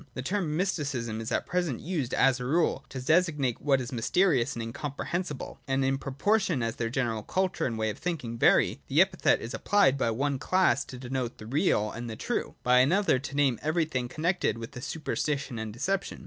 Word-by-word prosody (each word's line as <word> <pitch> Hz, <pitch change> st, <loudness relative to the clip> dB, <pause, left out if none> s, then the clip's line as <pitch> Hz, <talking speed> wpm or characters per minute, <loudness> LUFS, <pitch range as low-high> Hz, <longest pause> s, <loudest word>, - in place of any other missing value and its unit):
The 130 Hz, -, -4 dB
term 165 Hz, -2 st, -1 dB
Mysticism 140 Hz, -, -2 dB
is 115 Hz, +2 st, -5 dB
at -, -, 0 dB
present 175 Hz, -9 st, -1 dB
used, 155 Hz, -8 st, -3 dB
as 135 Hz, -1 st, +3 dB
a 125 Hz, -, -4 dB
rule, 160 Hz, +6 st, +1 dB
to 130 Hz, -, -6 dB
designate 150 Hz, -3 st, +1 dB
what 135 Hz, -2 st, +3 dB
is 125 Hz, -2 st, -5 dB
mysterious 135 Hz, +2 st, +2 dB
and 115 Hz, -, -3 dB
incomprehensible: 145 Hz, +6 st, -4 dB
and 135 Hz, 0 st, +1 dB
in 135 Hz, 0 st, +1 dB
propor 145 Hz, +12 st, +1 dB
tion 150 Hz, -11 st, -1 dB
as 115 Hz, 0 st, -2 dB
their 115 Hz, -, -1 dB
general 115 Hz, -3 st, -1 dB
culture 185 Hz, -, -1 dB
and 115 Hz, -3 st, -3 dB
way 110 Hz, 0 st, 0 dB
of -, -, -10 dB
thinking 150 Hz, -10 st, -3 dB
vary, -, -, +4 dB
the -, -, +2 dB
epithet -, -, +3 dB
is 115 Hz, -, -6 dB
applied 200 Hz, -10 st, +3 dB
by 115 Hz, -, +2 dB
one 135 Hz, +4 st, -1 dB
class 185 Hz, -5 st, +2 dB
to 130 Hz, -, -9 dB
denote 125 Hz, -1 st, -4 dB
the 110 Hz, -, -10 dB
real 115 Hz, -, +1 dB
and 120 Hz, 0 st, -6 dB
the 110 Hz, -, -5 dB
true, -, -, -3 dB
by 125 Hz, 0 st, +5 dB
another 170 Hz, +2 st, +3 dB
to 135 Hz, +1 st, -7 dB
name 140 Hz, -4 st, +2 dB
everything 155 Hz, -5 st, 0 dB
connected 160 Hz, -, 0 dB
with 115 Hz, +2 st, -8 dB
super 160 Hz, -, -4 dB
stition 140 Hz, -6 st, -2 dB
and 110 Hz, -1 st, -5 dB
deception. 190 Hz, -, -2 dB
135 Hz, 205 wpm, -28 LUFS, 120-165 Hz, -, by